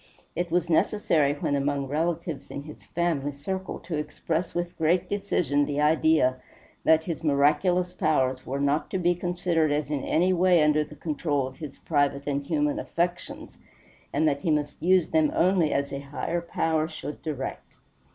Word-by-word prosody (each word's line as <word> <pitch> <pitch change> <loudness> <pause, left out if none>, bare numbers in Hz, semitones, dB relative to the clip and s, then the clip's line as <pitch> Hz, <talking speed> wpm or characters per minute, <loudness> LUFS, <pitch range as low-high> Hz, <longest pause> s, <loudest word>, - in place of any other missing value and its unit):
It 175 +1 -2
was 175 0 +1
necessary 160 -4 +2
when 145 - -1
among 140 0 0
relatives 165 +1 -2
in 140 - -6
his 150 0 -12
family 160 -5 -1
circle 190 +7 -4
to 170 -2 -4
express 160 +3 -3
with 175 0 -2
great 170 +3 +1
decision 180 -8 0
the 145 0 -2
idea 150 -3 +3 0.5
that 160 0 +4
his 165 -1 -5
miraculous 175 +5 +2
powers 130 -6 +1
were 135 +2 -4
not 140 +2 0
to - - -1
be 175 -1 +2
considered 175 -3 0
as 145 -1 -1
in 145 -3 -1
any 180 +3 +2
way 180 -2 +4
under 150 0 +3
the 150 - -12
control 145 -3 -1
of 130 0 -9
his 150 -4 -8
private 145 -2 0
and 140 -1 -2
human 150 -3 0
affections, 175 +1 -3 0.5
and 155 +2 +2
that 140 -2 +1
he 160 - -2
must 150 -1 -1
use 185 -1 +3
them 155 -2 +3
only 175 -3 +3
as 140 0 -1
a 140 - -3
Higher 145 +5 -3
Power 160 -2 0
should 155 -2 -7
direct. 145 -4 -5
155 Hz, 170 wpm, -26 LUFS, 145-175 Hz, 0.5 s, that